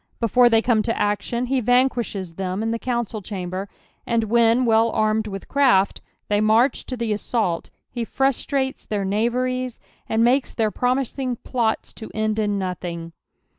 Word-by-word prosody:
Befon 240 +2 +4
Ihey 225 -1 +3
come 230 -3 +3
to 230 +1 -2
action 210 +4 0
he 260 +1 0
vuncpiiehes 240 -7 +1
tliem 190 +3 -3
in 225 - -1
the 230 - -2
council 235 -3 -2
chainbcr; 185 0 -5 0.4
and 230 -1 +1
when, 230 +2 +3
well 225 0 +4
armed 215 0 +1
with 195 -2 -7
craft, 250 -9 +3 0.3
lliey 205 0 +2
march 230 +5 +3
to 255 - -4
the 230 -2 -1
assault, 205 -5 -1 0.2
he 240 -1 -4
frustrates 270 +2 -1
their 205 -2 -2
knaveries, 250 +4 -1 0.3
and 225 +1 +2
makes 255 +3 +2
their 220 -2 +1
promiaing 255 0 -1
plots 230 -3 -1
to 220 - -9
end 215 0 0
in 205 -1 0
nothing. 175 -3 -4
225 Hz, 160 wpm, -22 LUFS, 205-245 Hz, 0.4 s, Befon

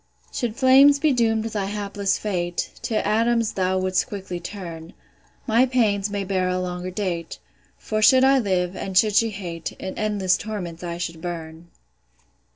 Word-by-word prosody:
Should 235 -4 -3
flames 270 +2 +6
be 295 0 +2
doom'd 225 -3 +1
thy 215 -3 -3
hapless 200 -1 -2
fate, 175 -4 -2
To 230 -3 -1
atoms 230 +1 +2
thou 185 0 0
wouldst 185 0 0
quickly 190 -3 -6
turn: 170 -3 -8 0.5
My 240 +2 +3
pains 210 -5 +1
may 200 -1 -3
bear 185 -1 0
a 180 0 0
longer 180 0 -4
date; 180 -4 -4 0.4
For 215 0 -3
should 260 +4 +6
I 270 0 +5
live, 185 -4 0
and 190 -1 -3
should 215 +1 +4
she 225 +1 +4
hate, 175 -5 -6
In 190 - -7
endless 205 -4 +1
torments 180 -6 -6
I 170 -1 -4
should 170 -2 -5
burn. 165 -1 -7
200 Hz, 165 wpm, -23 LUFS, 180-220 Hz, 0.5 s, flames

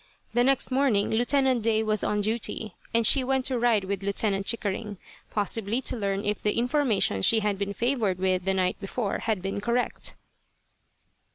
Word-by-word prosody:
The 240 - +3
next 270 0 +1
morning 255 -6 +2
Lieutenant 255 +2 +2
Day 220 0 +1
was 215 -1 0
on 210 0 0
duty, 220 -1 -1 0.2
and 230 -1 +2
she 270 +2 +5
went 265 0 0
to 255 -2 +2
ride 230 -4 +2
with 195 0 -3
Lieutenant 200 0 0
Chickering, 210 -2 -1 0.3
possibly 215 +2 -1
to - - +1
learn 200 -2 -2
if 205 0 -1
the 210 - 0
information 240 - +1
she 220 - +4
had 205 -2 -1
been 200 0 -2
favoured 230 -5 0
with 185 -1 0
the 190 0 +1
night 185 -1 0
before 200 +1 -3
had 215 -5 -2
been 195 +1 -3
correct. 235 +3 -1
215 Hz, 175 wpm, -26 LUFS, 200-240 Hz, 0.3 s, she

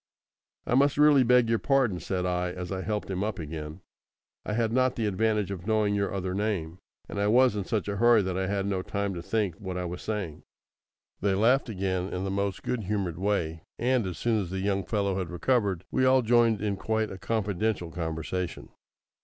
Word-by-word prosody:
"I - - -1
must 140 +2 +4
really 150 -2 +6
beg 125 -1 +4
your 115 0 +2
pardon," 130 -10 +2
said 90 +3 -2
I, 90 0 0
as 90 0 -6
I 95 -1 -2
helped 105 +2 -3
him 95 +1 -1
up 105 -2 -2
again. 80 +1 -6 0.6
"I 105 - -3
had 115 0 0
not 130 0 +2
the 115 - -1
advantage 105 0 0
of 95 0 -6
knowing 110 -2 +2
your 100 -1 0
other 95 -1 -2
name, 95 -5 -2 0.3
and 100 - -5
I 100 - +2
was 125 +1 +5
in 100 -2 -2
such 105 -5 -1
a 100 0 -2
hurry 120 -1 +5
that 95 -1 -2
I 95 0 -1
had 100 0 -1
no 95 -2 -1
time 100 +1 -2
to 85 - -5
think 105 0 -1
what 95 -3 -5
I 90 - -2
was 90 +1 -5
saying." 100 -8 -4 0.8
They 100 -1 +1
laughed 120 +6 +3
again 95 -2 -2
in 90 - -3
the 95 - -2
most 100 0 -2
good 115 -5 -2
humoured 95 -4 -2
way, 85 -5 -1 0.2
and, 125 -3 +1
as 90 - -5
soon 115 -3 +1
as 90 - -5
the 95 - -4
young 100 0 0
fellow 100 -3 0
had 90 - -3
recovered, 95 0 0
we 130 - +1
all 130 0 +5
joined 115 -2 +3
in 100 -2 -1
quite 110 +3 -1
a 95 - -8
confidential 105 -4 -1
conversation. 85 +2 -4
100 Hz, 210 wpm, -28 LUFS, 90-110 Hz, 0.8 s, really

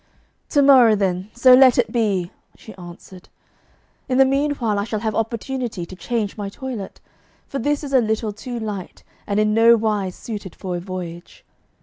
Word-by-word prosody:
'To 285 -3 +3
morrow, 255 -5 +6
then, 190 -1 -2
so 250 +2 +5
let 255 -1 +6
it 245 -2 +1
be!' 200 -7 0 0.3
she 220 - -12
answered. 180 0 -13 0.8
'In 255 - +1
the 270 - +6
meanwhile 270 -6 0
I - - -1
shall 215 -1 -4
have 220 -1 -2
opportunity 230 -3 -3
to 185 - -11
change 215 +1 -3
my 205 -1 -4
toilet, 235 -2 -7 0.5
for 275 - -4
this 290 +4 -1
is 280 -1 -6
a 260 - +5
little 220 -1 -2
too 240 +3 -7
light 205 -5 -7 0.2
and 205 0 0
in 215 0 +2
nowise 220 -4 +3
suited 205 -6 -8
for 185 -2 -5
a - - -3
voyage. 175 -2 -8
220 Hz, 175 wpm, -21 LUFS, 195-250 Hz, 0.8 s, morrow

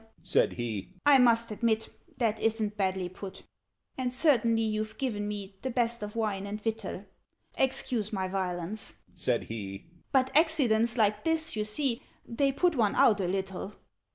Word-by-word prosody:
said - - +2
he. 115 -5 -4 0.2
"I 285 -2 +7
must 235 -2 +4
admit 220 0 0 0.3
That 225 -3 +1
isn't 220 -2 0
badly 190 -2 0
put. 190 +2 -9 0.6
"And 250 -1 0
certainly 235 -5 +3
you've 215 0 -2
given 210 -6 -2
me 200 -2 -6
The 260 - -2
best 235 -2 0
of 210 +1 -6
wine 205 -3 -1
and 210 +1 -4
victual 215 -3 -4 0.5
Excuse 245 -5 0
my 190 -3 -1
violence," 180 - -3 0.2
said 120 -2 0
he, 105 +6 -7 0.2
"But 265 -1 +2
accidents 250 -8 +3
like 210 -1 +2
this, 325 -3 +1
you 215 - 0
see, 235 +2 0 0.2
They 275 +4 +1
put 345 +4 +2
one 220 -5 +2
out 210 -3 +5
a 180 - 0
little. 190 +1 -3
215 Hz, 155 wpm, -29 LUFS, 195-240 Hz, 0.6 s, I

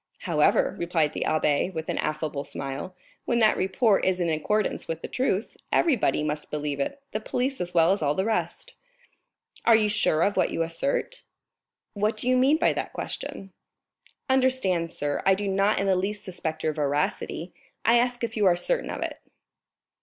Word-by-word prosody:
"However," - - +2
replied 165 -3 +1
the - - -2
abbé, 155 +2 +1
with 160 -2 -5
an - - -2
affable 155 -2 -2
smile, 140 +8 -6 0.3
"when 235 - +1
that 220 -2 +4
report 195 +2 +2
is 185 -1 +1
in 175 -1 +1
accordance 210 +7 -1
with 165 0 -4
the - - -3
truth, 235 -5 -1 0.2
everybody 260 - +2
must 150 0 -3
believe 150 -1 -3
it, 280 - -2
the 215 - -2
police 255 +3 -2
as 175 0 -5
well 165 +1 +5
as 195 - +1
all 145 -1 +1
the 190 - 0
rest." 225 - -2 0.9
"Are 230 - +6
you 215 -1 +3
sure 170 -6 +2
of 205 - +1
what - - +3
you 165 - -1
assert?" 275 - -2 0.7
"What 210 +1 0
do 245 - -4
you 255 - +4
mean 265 +5 +4
by 335 - +3
that - - -4
question?" 195 -1 -6 0.7
"Understand, 255 -11 +2
sir, 145 -3 -2
I 195 - +5
do 200 +1 -3
not 195 +2 +2
in 195 - 0
the 190 -1 +3
least 205 +3 -2
suspect 175 -5 -4
your 155 - +1
veracity; 150 +3 -2 0.3
I 235 +1 +6
ask 245 0 -1
if 225 -1 -2
you 210 -3 +3
are 175 - +5
certain - - 0
of - - -3
it?" - - -5
190 Hz, 185 wpm, -26 LUFS, 160-230 Hz, 0.9 s, Are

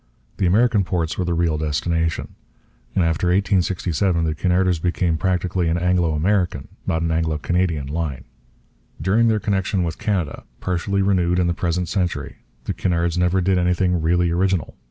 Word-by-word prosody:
The 95 - +1
American 105 +2 +3
ports 85 -3 -1
were 90 - -2
the 85 -1 0
real 85 -2 +1
destination. 80 +1 -1 0.6
And 95 - +3
after 80 +2 0
1867 90 -2 +1
the 80 - 0
Cunarders 90 +1 +1
became 85 -1 0
practically 90 0 0
an 85 - +1
Anglo 90 -2 +1
American, 90 -2 0 0.2
not 80 0 0
an 85 - 0
Anglo 80 -1 0
Canadian, 85 -2 0
line. 70 -3 -3 0.8
During 100 +9 +2
their 110 -1 +2
connection 95 -2 0
with 80 -2 -4
Canada, 90 -8 -2 0.2
partially 95 +2 -1
renewed 90 -3 +2
in 90 - +2
the 85 - +1
present 85 +1 -1
century, 90 -1 -2 0.3
the - - -3
Cunards 85 -2 0
never 90 +1 +2
did 95 0 +2
anything 90 0 +1
really 85 +1 +2
original. 90 -2 0
90 Hz, 160 wpm, -21 LUFS, 80-95 Hz, 0.8 s, American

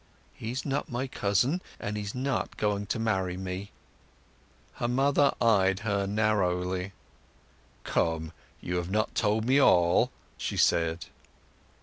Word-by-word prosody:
"He's 120 +4 -5
not 140 -1 -2
my 125 +2 -1
cousin, 125 - +1 0.2
and 105 - -4
he's 105 +1 -4
not 135 +2 -2
going 105 -1 -1
to - - -1
marry 95 -5 -1
me." 95 +1 -5 1.1
Her 120 - -1
mother 140 +3 +3
eyed 95 -5 +3
her 100 -2 0
narrowly. 95 -3 0 0.9
"Come, 80 -1 -1 0.3
you 90 0 -2
have 90 0 -3
not 110 +2 0
told 110 +2 +1
me 130 +3 +4
all," 85 -8 +4 0.3
she - - -3
said. 85 0 +2
100 Hz, 125 wpm, -28 LUFS, 90-120 Hz, 1.1 s, me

